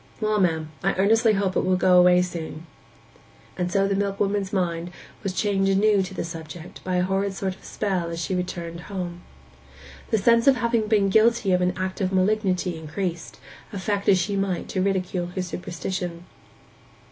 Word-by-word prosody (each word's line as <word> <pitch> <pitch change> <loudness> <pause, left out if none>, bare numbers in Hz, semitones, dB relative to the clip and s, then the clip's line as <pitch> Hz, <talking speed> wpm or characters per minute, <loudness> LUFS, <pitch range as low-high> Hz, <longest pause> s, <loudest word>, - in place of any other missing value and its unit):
'Well, 215 -1 +1
ma'am, 160 -3 0
I 195 - +1
earnestly 220 +4 +4
hope 195 -2 0
it - - +3
will 185 0 +2
go 180 0 +5
away 180 0 +6
soon.' 165 -2 -6 0.9
And 180 -1 -2
so 195 0 +2
the 200 - 0
milkwoman's 200 0 -1
mind 175 -3 -1 0.3
was 195 - -2
chained 195 0 +1
anew 200 +1 +4
to 190 0 -5
the - - -2
subject 165 0 -9
by 185 -1 -2
a 180 - +2
horrid 195 +1 -1
sort 190 -1 -2
of - - -22
spell 185 -5 -2
as 165 0 -5
she 170 +3 -2
returned 175 -2 -4
home. 180 -3 -5 0.9
The 220 - +2
sense 230 +4 +3
of 275 - +7
having 230 -2 0
been 205 -2 +3
guilty 220 0 +3
of 180 0 +3
an 180 0 +1
act 185 +1 -3
of 190 -1 0
malignity 185 -3 +1
increased, 170 +1 -5 0.3
affect 200 0 -1
as 195 - +6
she 200 +2 -1
might 195 -2 -1
to 185 - -1
ridicule 185 -2 -1
her 185 - -1
superstition. 180 -1 -5
190 Hz, 180 wpm, -24 LUFS, 180-200 Hz, 0.9 s, of